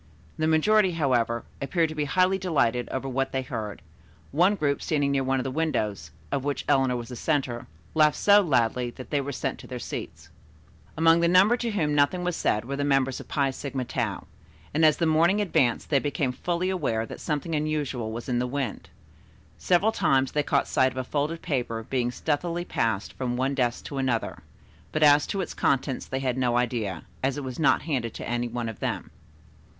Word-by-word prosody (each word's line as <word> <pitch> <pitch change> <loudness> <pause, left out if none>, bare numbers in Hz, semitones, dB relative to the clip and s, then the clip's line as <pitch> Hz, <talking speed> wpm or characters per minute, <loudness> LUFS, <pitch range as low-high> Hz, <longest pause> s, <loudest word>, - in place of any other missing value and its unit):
The 155 - +2
majority, 185 +5 +4
however, 120 -7 +1 0.2
appeared 165 +3 +1
to - - -5
be 150 -1 -1
highly 185 +4 +2
delighted 125 -10 +1
over 130 +1 -3
what 135 +1 -1
they 130 0 -1
heard, 110 -6 -5 0.5
one 180 +8 +4
group 145 -6 0
standing 145 -3 0
near 135 -1 +1
one 135 0 +1
of - - -2
the 135 - -3
windows, 105 - -1 0.2
of 135 - -1
which 145 0 -2
Eleanor 130 -2 +3
was 120 0 -5
the 125 - -6
center, 130 -4 -1 0.3
laughed 155 -1 +4
so 205 0 +6
loudly 125 - +1
that 130 +1 -11
they 145 -2 +1
were 140 +1 -4
sent 130 - -3
to - - -11
their 125 - -5
seats. - - -7 0.7
Among 165 +1 +5
the 170 - +3
number 185 +7 +5
to 240 -1 -2
whom 160 -9 0
nothing 145 +5 +2
was 180 -1 -1
said 105 -7 0
were 140 +2 -3
the 145 - -1
members 135 -2 +1
of - - -10
the - - -10
Phi 140 -2 +2
Sigma 130 -1 -4
Tau, - - -3 0.5
and 160 +2 +2
as 155 -2 +5
the 170 - +1
morning 165 +5 +3
advanced 135 - +1
they 140 - +5
became 145 -2 -1
fully 175 +7 -1
aware 125 -11 -1
that - - -9
something 155 +1 -3
unusual 150 -7 -1
was 115 +1 -6
in 125 -2 0
the 125 - 0
wind. 135 0 -4 0.7
Several 185 +5 +3
times 135 -10 +2
they 150 - +1
caught 140 -1 +1
sight 130 0 +2
of 130 - -11
a 130 - -1
folded 150 +5 -2
paper 120 -5 -2
being 125 -2 0
stealthily 170 +6 -2
passed 110 - -1
from 125 -2 -3
one 135 +2 0
desk 120 -3 -1
to 140 - -4
another, 125 -4 -1 0.5
but 155 - +1
as 145 0 +6
to 195 - -2
its - - -5
contents 135 -1 0
they 130 0 -3
had 130 -1 -1
no 120 -2 +2
idea, 115 -8 -1 0.2
as 135 +1 0
it 145 - -4
was 130 +1 -6
not 155 - +3
handed 130 -8 -2
to - - -6
any 120 0 -1
one 120 0 -4
of 115 - -6
them. - - -3
140 Hz, 210 wpm, -26 LUFS, 125-160 Hz, 0.7 s, so